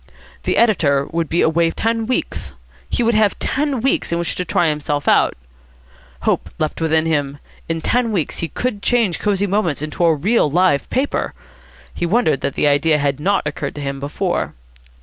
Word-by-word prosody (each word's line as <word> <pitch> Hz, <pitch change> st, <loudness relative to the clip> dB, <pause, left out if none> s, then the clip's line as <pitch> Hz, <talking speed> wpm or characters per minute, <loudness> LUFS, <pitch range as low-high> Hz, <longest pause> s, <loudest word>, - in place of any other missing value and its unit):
The -, -, +1 dB
editor 150 Hz, -12 st, +3 dB
would 165 Hz, -1 st, -1 dB
be 170 Hz, -, +1 dB
away 165 Hz, +1 st, +3 dB
ten 225 Hz, +5 st, -1 dB
weeks. 250 Hz, -, -2 dB, 0.4 s
He 245 Hz, -, 0 dB
would 235 Hz, +1 st, +2 dB
have 215 Hz, -2 st, +2 dB
ten 280 Hz, -3 st, -1 dB
weeks 270 Hz, -7 st, 0 dB
in 170 Hz, -, +1 dB
which 170 Hz, -1 st, -1 dB
to 180 Hz, -, -2 dB
try 175 Hz, 0 st, +1 dB
himself 150 Hz, -1 st, -2 dB
out. -, -, +4 dB, 0.9 s
Hope -, -, 0 dB
leaped 155 Hz, +1 st, -2 dB
within 160 Hz, 0 st, +2 dB
him. 145 Hz, -3 st, -1 dB, 0.3 s
In 165 Hz, 0 st, -1 dB
ten 240 Hz, +5 st, +1 dB
weeks 175 Hz, -9 st, -2 dB
he 165 Hz, -, -2 dB
could 210 Hz, -, -3 dB
change 225 Hz, -6 st, +1 dB
Cosy 205 Hz, -1 st, +1 dB
Moments 185 Hz, -7 st, 0 dB
into 155 Hz, +3 st, -2 dB
a 165 Hz, -2 st, +4 dB
real 190 Hz, +3 st, +2 dB
live 175 Hz, -2 st, +2 dB
paper. 265 Hz, +3 st, -1 dB, 0.6 s
He 175 Hz, -, -2 dB
wondered 175 Hz, -, +2 dB
that 140 Hz, -, -2 dB
the -, -, +2 dB
idea 150 Hz, +2 st, +3 dB
had 140 Hz, -1 st, 0 dB
not 195 Hz, +3 st, +1 dB
occurred 150 Hz, -, -4 dB
to 145 Hz, -, -6 dB
him 140 Hz, -1 st, -4 dB
before. 175 Hz, +6 st, -2 dB
170 Hz, 185 wpm, -19 LUFS, 150-215 Hz, 0.9 s, out